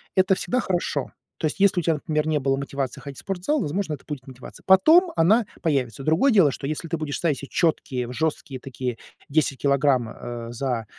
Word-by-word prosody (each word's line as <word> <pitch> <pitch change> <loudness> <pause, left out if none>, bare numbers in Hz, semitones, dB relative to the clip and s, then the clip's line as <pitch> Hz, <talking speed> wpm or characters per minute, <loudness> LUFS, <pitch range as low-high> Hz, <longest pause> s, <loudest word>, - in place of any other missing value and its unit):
это 190 0 +4
всегда 250 +5 -1
хорошо. 180 -3 -2 0.3
То - - -2
есть 150 - -6
если 195 -2 +4
у - - -3
тебя, 165 -1 +2
например, 155 0 -1
не 155 -1 +1
было 135 0 +1
мотивации 140 -2 -4
ходить 140 -2 -9
в - - -9
спортзал, 195 +11 -1
возможно, 160 +1 -2
это 140 - -9
будет 140 -3 -6
мотивация. 130 -1 -12
Потом 320 - +6
она 210 +7 +4 0.2
появится. 135 - -1
Другое 165 - +3
дело, 185 -10 +5
что 135 - -5
если 155 +2 -4
ты 165 +1 -2
будешь 150 -2 -3
ставить 155 -6 0
четкие, 130 -7 0
жесткие 150 -3 -2
такие 125 -2 -5 0.3
10 145 -2 +1
килограмм, 140 -4 +2
а, 120 0 -7
за 120 -2 -2
150 Hz, 195 wpm, -24 LUFS, 135-175 Hz, 0.3 s, Потом